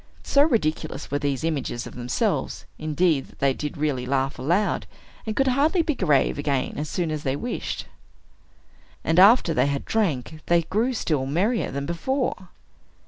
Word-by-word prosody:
So 280 - +3
ridiculous 160 - 0
were 145 - 0
these 140 0 -1
images 140 -7 -2
of - - -9
themselves, 125 0 -2
indeed, 155 -1 +1
that - - -20
they 135 -1 +2
did 150 +2 -5
really 140 -4 -1
laugh 135 +1 0
aloud, 175 +11 0 0.4
and 215 - -2
could 270 -1 +2
hardly 305 +7 +2
be 310 - 0
grave 150 - +2
again 140 -2 -1
as 150 +1 -3
soon 170 -3 -1
as 155 -1 -3
they 135 -2 -1
wished. 240 +12 -4 1.2
And 165 +2 +2
after 200 -3 +6
they 140 - +2
had 140 -1 -2
drank, 160 - -1
they 170 -1 +3
grew 220 +10 0
still 145 -10 -1
merrier 200 - 0
than 140 +1 -4
before. 190 - -2
155 Hz, 165 wpm, -24 LUFS, 140-210 Hz, 1.2 s, after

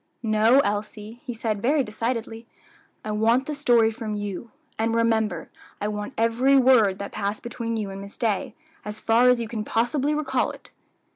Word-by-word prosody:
"No, 220 +4 +4
Elsie," 210 +1 -4
he 245 - -3
said, 220 -2 -2
very 280 +4 +2
decidedly; 230 0 -4 0.6
"I 215 - -3
want 230 +5 +2
the 300 - -4
story 240 -6 +3
from 220 -2 -5
you; 205 +2 -5 0.3
and 225 +1 +1
remember, 225 -2 0 0.3
I 205 - -2
want 210 0 -5
every 240 +5 +3
word 245 -7 +5
that 200 0 -6
passed 205 0 -3
between 230 -1 -4
you 205 -3 -3
and 195 0 -7
Miss 200 0 -11
Day, 215 -5 -1 0.3
as 210 0 -6
far 235 +3 +4
as 250 -1 +4
you 230 - -3
can 220 -1 -4
possibly 270 +7 0
recall 265 -4 0
it." - - -12
225 Hz, 175 wpm, -24 LUFS, 210-245 Hz, 0.6 s, word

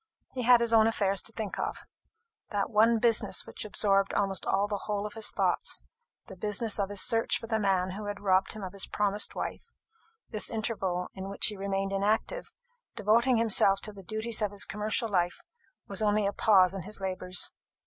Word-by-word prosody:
He 255 - -3
had 245 0 +6
his 230 -1 +1
own 220 -1 +6
affairs 200 -3 +1
to - - -6
think 220 -3 -5
of, - - -2 0.7
that 205 0 -2
one 225 +2 +4
business 230 -1 +1
which - - -6
absorbed 200 -2 +1
almost 195 -1 0
the 205 +1 0
whole 205 -1 -2
of 210 - -6
his 225 -1 -2
thoughts - - -1 0.4
the 190 - -11
business 210 +3 0
of 200 -1 0
his 205 -1 0
search 225 -1 +2
for - - -8
the 220 -1 -1
man 190 -2 +1
who 210 +3 -6
had 205 -1 -4
robbed 190 -1 +2
him 215 - -8
of 185 0 -6
his 200 - -2
promised 205 0 0
wife, 465 - -5 0.6
this 215 -3 -1
interval, 195 -6 -2
in 190 0 -7
which 200 - +3
he 210 - +3
remained 195 0 -2
inactive, 215 - -1 0.4
devoting 235 +4 +3
himself 200 -3 +3
to 210 - -5
the 200 - -11
duties 220 +3 -1
of 210 - +1
his 205 0 -1
commercial 215 +2 -2
life, 180 -4 -1 0.4
was 200 +1 -2
only 210 -1 +2
a 200 - 0
pause 190 -4 +4
in 195 - -5
his 210 +5 -5
labours. 185 -1 -1
205 Hz, 195 wpm, -29 LUFS, 195-220 Hz, 0.7 s, had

